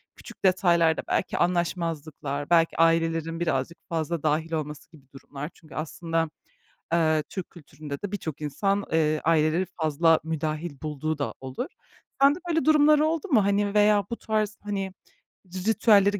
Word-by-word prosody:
küçük - - -14
detaylarda 170 -3 +3
belki - - -1
anlaşmazlıklar, 165 -5 -2
belki 165 -1 +3
ailelerin 165 0 +2
birazcık 170 0 -1
fazla 165 -1 -2
dâhil 155 +2 0
olması 150 -1 -4
gibi 150 -5 -18
durumlar? 140 +2 -8
Çünkü 155 - -16
aslında, 165 +1 -2 0.6
eee, 160 -2 +3
Türk 190 -3 -6
kültüründe 145 -3 -9
de 205 - -4
birçok 160 -7 -5
insan, 195 +8 0
eee, 155 -1 +2
aileleri 160 +2 +2 0.2
fazla 160 +1 +3
müdahil 155 0 -3
bulduğu 155 +1 -2
da 145 - -3
olur. 130 - -4 0.5
Sende 280 +4 +5
böyle 325 -1 +1
durumlar 300 -1 +5
oldu 315 +3 0
mu, 230 -9 +4
hani, 200 0 +1
veya 210 -1 +4
bu 235 - -2
tarz, 215 -1 -1
hani, 195 -2 -3 0.7
ritüelleri 205 -2 +4
165 Hz, 140 wpm, -26 LUFS, 155-200 Hz, 0.7 s, Sende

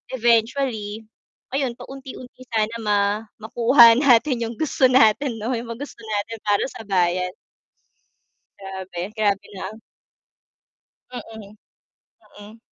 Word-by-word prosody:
eventually, 230 -2 0 0.5
ayon 270 -3 0
paunti-unti 260 -1 -11
sana 220 0 0
ma 205 -1 +2 0.4
makuha 235 +2 +6
natin 255 -1 +3
yung 230 +1 -5
gusto 280 -4 +3
natin 245 +1 +3
'no? 230 +4 -2
Yung 230 0 -5
mga 230 - -8
gusto - - -16
natin 220 +1 -3
para 205 -1 +2
sa - - -9
bayan. 180 -1 0 1.2
Grabe. 190 -1 -7
Grabe 205 -2 +1
na 190 - -8
ang 215 +2 -12 1.3
Mm. 220 -4 -10 0.9
Mm. 210 +2 -13
225 Hz, 115 wpm, -22 LUFS, 205-245 Hz, 1.3 s, makuha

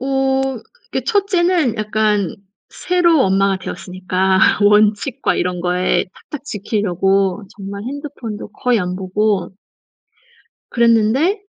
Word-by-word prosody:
어. 270 -1 0 0.3
그게 - - -3
1 405 -4 +1
째는 345 - +2
약간 215 -3 0 0.4
새로 345 -4 +2
엄마가 195 0 +2
되었으니까 185 0 -1 0.2
원칙과 210 +5 +3
이런 180 0 -2
거에 180 +1 +1 0.3
탁탁 290 -2 -7
지키려고 195 -4 0
정말 200 0 -7
핸드폰도 260 -6 -6
거의 245 +1 +1
안 180 0 -3
보고 195 -1 -1 1.2
그랬는데 235 - +2
215 Hz, 235 characters per minute, -18 LUFS, 190-270 Hz, 1.2 s, 원칙과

